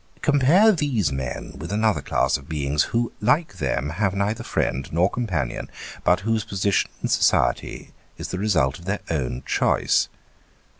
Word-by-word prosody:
Compare 150 +9 +5
these 140 - 0
men 65 -2 -5
with 85 +4 -6
another 110 0 +1
class - - +1
of 70 +1 -7
beings 75 -1 0
who, 115 0 -1
like 125 - +1
them, 70 0 -1
have 100 -2 +1
neither 105 +4 -1
friend 65 - -2
nor 85 +3 +3
companion, 90 - -3 0.3
but 90 +1 +3
whose 110 +1 0
position 100 0 0
in - - +1
society - - +1 0.3
is - - -6
the 95 - -4
result 85 -11 +1
of 85 - -14
their 100 +2 -2
own 65 -5 -2
choice. - - +2
100 Hz, 155 wpm, -23 LUFS, 75-115 Hz, 0.3 s, Compare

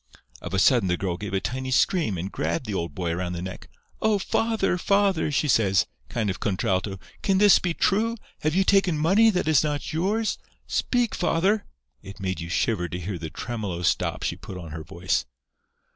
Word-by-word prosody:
"Of - - -4
a - - +1
sudden 115 0 +4
the 90 0 +1
girl 90 -2 -2
gave 100 +1 -5
a - - +2
tiny 130 +5 -4
scream 130 - +2
and 90 +4 -4
grabbed 85 +10 -2
the 105 - -4
old 85 -5 -3
boy 90 -2 -2
around 90 +1 -2
the 85 - -4
neck. 95 0 -7 0.3
'Oh, 215 -1 +3
father, 220 -1 0
father!' 195 -5 +2
she 150 +1 +1
says, 100 -8 +3 0.2
kind 110 -4 -1
of 90 - -7
contralto, 95 0 -1 0.2
'can 195 -1 +2
this 205 0 +7
be 175 -2 -2
true? 225 +4 +1 0.2
Have 155 +1 0
you 195 - +4
taken 190 -4 +3
money 195 +9 +5
that 180 -6 0
is 155 -3 +4
not 150 0 -2
yours? 205 +7 0 0.3
Speak, 245 -3 0
father!' 190 +5 +1 0.3
It 95 +1 -11
made 95 -2 -3
you 85 - -6
shiver 90 +1 0
to 85 - -4
hear 90 0 -4
the 80 -1 -5
tremolo 100 -4 -4
stop - - 0
she - - -1
put 95 - -9
on 85 -3 -8
her 80 0 -6
voice. 90 -3 -1
115 Hz, 200 wpm, -25 LUFS, -, 0.3 s, this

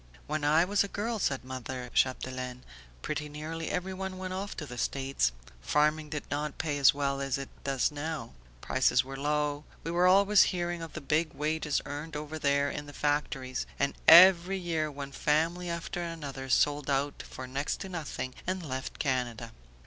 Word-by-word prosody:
"When 150 0 -2
I 155 +4 +4
was 200 +2 +2
a - - -3
girl," 220 +3 -3
said 135 -8 -1
mother 130 -1 -6
Chapdelaine, 130 -1 -1 0.4
"pretty 150 0 -3
nearly 155 +2 -5
everyone 190 +1 -3
went 185 0 -4
off 195 +2 -4
to 155 - -4
the 125 -3 -7
States. 135 - 0 0.3
Farming 150 - +1
did 150 -1 -3
not 145 0 -2
pay 145 -3 -1
as 135 - +8
well 140 -1 -1
as 135 -1 -1
it 135 -1 -6
does 135 -1 +1
now, 150 -4 -5 0.3
prices 130 -1 +3
were 135 +1 -8
low, 150 +1 0 0.2
we 165 - -3
were 175 +1 +4
always 200 +2 +6
hearing 175 -2 -2
of 165 -1 -7
the 155 - -6
big 155 +3 0
wages 150 0 0
earned 150 +2 -6
over 150 +1 -5
there 140 -1 +2
in 145 0 -6
the 145 - -10
factories, 140 -3 -1
and 140 - +1
every 185 +2 +9
year 165 -4 -1
one 140 -1 -7
family 165 +5 +1
after 170 +1 -3
another 145 -6 -5
sold 145 +2 +2
out 140 +1 0
for 130 - -8
next 135 +3 -2
to 195 - -4
nothing 155 -7 -4
and 185 -2 -2
left 130 -1 -4
Canada. 120 -4 -2
150 Hz, 180 wpm, -30 LUFS, 135-165 Hz, 0.4 s, every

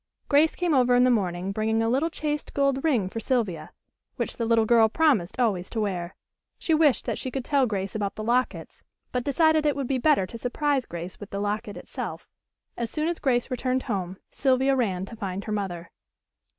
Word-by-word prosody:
Grace 300 +2 +4
came 350 -3 0
over 250 -2 +4
in 245 - +5
the 255 - +4
morning 185 -4 0
bringing 220 +2 0
a - - +1
little 270 +8 +1
chased 300 -2 -4
gold 275 -1 +1
ring 250 -12 +2
for 225 - -5
Sylvia, 225 -7 -1 0.4
which - - -3
the 230 - -1
little 225 -1 +4
girl 225 -1 +5
promised 255 - +2
always 200 -7 +1
to 225 - -3
wear. 185 -4 -2 0.4
She 325 - 0
wished 310 -4 +3
that - - -2
she 260 - -3
could 260 -1 -4
tell 280 -3 +2
Grace 195 -3 -3
about 205 -2 -2
the 215 - -5
lockets, 245 +3 -1 0.3
but 250 -1 -1
decided 315 +3 +3
it 295 -1 +2
would 280 -1 -2
be 260 +1 0
better 290 -8 +3
to 230 +5 -9
surprise 270 +2 0
Grace 175 +2 -7
with 205 - -9
the 200 - -4
locket 205 0 -3
itself. - - -6 0.5
As 235 -1 -3
soon 305 0 -1
as 345 0 -2
Grace 250 -1 0
returned 255 +1 -1
home 190 -5 -3
Sylvia 265 0 +2
ran 190 -7 0
to 230 - -10
find 195 -3 -4
her 215 - -6
mother. 175 -5 -4
235 Hz, 205 wpm, -26 LUFS, 200-275 Hz, 0.5 s, in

